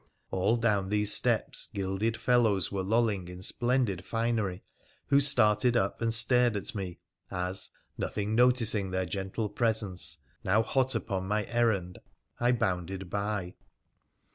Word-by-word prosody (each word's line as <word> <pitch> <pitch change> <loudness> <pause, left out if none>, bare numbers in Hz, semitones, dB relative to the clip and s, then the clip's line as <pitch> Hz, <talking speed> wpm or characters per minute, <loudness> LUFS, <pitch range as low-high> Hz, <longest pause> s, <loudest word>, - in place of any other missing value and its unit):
All 100 +5 +1
down 105 -5 +1
these 105 0 +3
steps - - 0
gilded 100 +3 -2
fellows 110 -7 +2
were 100 -1 -2
lolling 105 -2 0
in 90 +1 -9
splendid 120 -5 0
finery, 115 -4 -2 0.5
who 140 0 +5
started 120 -3 +3
up - - -1
and 115 0 +1
stared 115 0 +4
at 100 - -4
me, 95 -5 -5 0.3
as, 90 0 -1 0.3
nothing 105 +1 -2
noticing 115 -4 +3
their 95 0 -1
gentle 95 +5 -3
presence, 100 -8 -1 0.3
now 105 +4 +3
hot 130 +2 0
upon 95 -3 -3
my 105 +1 0
errand, 110 -7 0 0.4
I 120 +1 +3
bounded 95 -4 -2
by. 100 -3 -2
105 Hz, 135 wpm, -29 LUFS, 95-115 Hz, 0.5 s, who